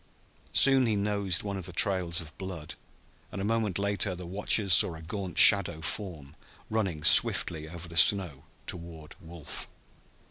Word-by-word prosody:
Soon 135 Hz, -2 st, +3 dB
he 110 Hz, -, -1 dB
nosed 100 Hz, -2 st, -2 dB
one 100 Hz, -1 st, -6 dB
of 95 Hz, -1 st, -8 dB
the -, -, -9 dB
trails 90 Hz, -2 st, 0 dB
of 80 Hz, -3 st, -11 dB
blood, 90 Hz, -5 st, -8 dB, 0.6 s
and 95 Hz, -, -8 dB
a -, -, -5 dB
moment 110 Hz, -3 st, -2 dB
later 100 Hz, -1 st, -3 dB
the 90 Hz, 0 st, -10 dB
watchers 100 Hz, +1 st, +1 dB
saw 85 Hz, -1 st, +5 dB
a 80 Hz, -, -12 dB
gaunt 95 Hz, +2 st, -8 dB
shadow 100 Hz, -6 st, +5 dB
form 80 Hz, -5 st, -7 dB, 0.4 s
running 95 Hz, -9 st, -3 dB
swiftly 80 Hz, +1 st, +4 dB
over 85 Hz, 0 st, -10 dB
the 85 Hz, -, -13 dB
snow 80 Hz, -5 st, +3 dB, 0.2 s
toward 85 Hz, -3 st, -10 dB
Wolf. 85 Hz, -2 st, -10 dB
90 Hz, 155 wpm, -27 LUFS, 85-100 Hz, 0.6 s, saw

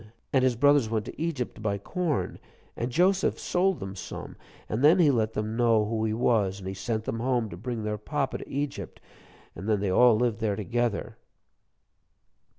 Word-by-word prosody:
And 130 Hz, -2 st, +4 dB
his 130 Hz, -2 st, +3 dB
brothers 145 Hz, -1 st, +4 dB
went 110 Hz, -1 st, -1 dB
to -, -, -8 dB
Egypt 155 Hz, -7 st, -2 dB
to -, -, -13 dB
buy 100 Hz, -2 st, -1 dB
corn, 165 Hz, -, -2 dB, 0.4 s
and 120 Hz, +2 st, -3 dB
Joseph 185 Hz, +7 st, +2 dB
sold 185 Hz, 0 st, +1 dB
them 95 Hz, -1 st, -6 dB
some, -, -, -7 dB, 0.3 s
and 110 Hz, +5 st, -2 dB
then 155 Hz, +5 st, +7 dB
he 160 Hz, -5 st, +5 dB
let 110 Hz, -3 st, 0 dB
them 110 Hz, +1 st, -2 dB
know 115 Hz, -3 st, +3 dB
who 110 Hz, +1 st, -1 dB
he 110 Hz, -, 0 dB
was. 105 Hz, -5 st, +2 dB
And 95 Hz, -2 st, -8 dB
he 95 Hz, -, -3 dB
sent 110 Hz, +3 st, -3 dB
them 115 Hz, -, -3 dB
home 120 Hz, -2 st, 0 dB
to -, -, -6 dB
bring 115 Hz, +4 st, -4 dB
their 105 Hz, 0 st, -2 dB
papa 140 Hz, +5 st, -2 dB
to -, -, -10 dB
Egypt, 135 Hz, -, -4 dB, 0.6 s
and 95 Hz, +6 st, -5 dB
then 105 Hz, -2 st, +2 dB
they 100 Hz, -1 st, 0 dB
all 120 Hz, +4 st, +6 dB
lived 115 Hz, -1 st, 0 dB
there 110 Hz, -3 st, 0 dB
together." 115 Hz, +1 st, -2 dB
115 Hz, 195 wpm, -27 LUFS, 105-135 Hz, 0.6 s, then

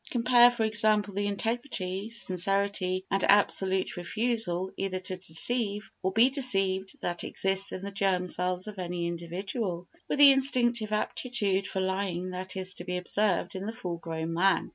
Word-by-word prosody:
Compare, 245 Hz, 0 st, +5 dB
for 240 Hz, -2 st, -2 dB
example, 215 Hz, -2 st, +2 dB
the 205 Hz, +1 st, -1 dB
integrity, 205 Hz, -2 st, -3 dB
sincerity 190 Hz, -2 st, -1 dB
and 195 Hz, 0 st, +1 dB
absolute 190 Hz, -2 st, +2 dB
refusal 190 Hz, -1 st, -1 dB
either 195 Hz, -1 st, -3 dB
to 185 Hz, 0 st, -5 dB
deceive 205 Hz, +4 st, 0 dB
or 190 Hz, -, 0 dB
be 230 Hz, +6 st, +4 dB
deceived 195 Hz, -8 st, +1 dB
that 175 Hz, 0 st, -2 dB
exists 195 Hz, 0 st, +1 dB
in 185 Hz, -, -6 dB
the 200 Hz, -, -5 dB
germ 195 Hz, -2 st, 0 dB
cells 180 Hz, +1 st, 0 dB
of 210 Hz, -2 st, -8 dB
any 175 Hz, -1 st, -3 dB
individual, 175 Hz, +2 st, -4 dB, 0.2 s
with -, -, -1 dB
the 285 Hz, -1 st, +9 dB
instinctive 240 Hz, -5 st, +1 dB
aptitude 210 Hz, -3 st, -1 dB
for 190 Hz, -, -3 dB
lying 185 Hz, -1 st, -2 dB
that 185 Hz, +1 st, -4 dB
is 185 Hz, 0 st, -2 dB
to -, -, -7 dB
be 180 Hz, 0 st, -3 dB
observed 190 Hz, +2 st, 0 dB
in 190 Hz, +2 st, -5 dB
the 225 Hz, -, -4 dB
full 180 Hz, -6 st, -5 dB
grown 165 Hz, 0 st, -5 dB
man. 190 Hz, +4 st, +2 dB
195 Hz, 165 wpm, -28 LUFS, 185-215 Hz, 0.2 s, the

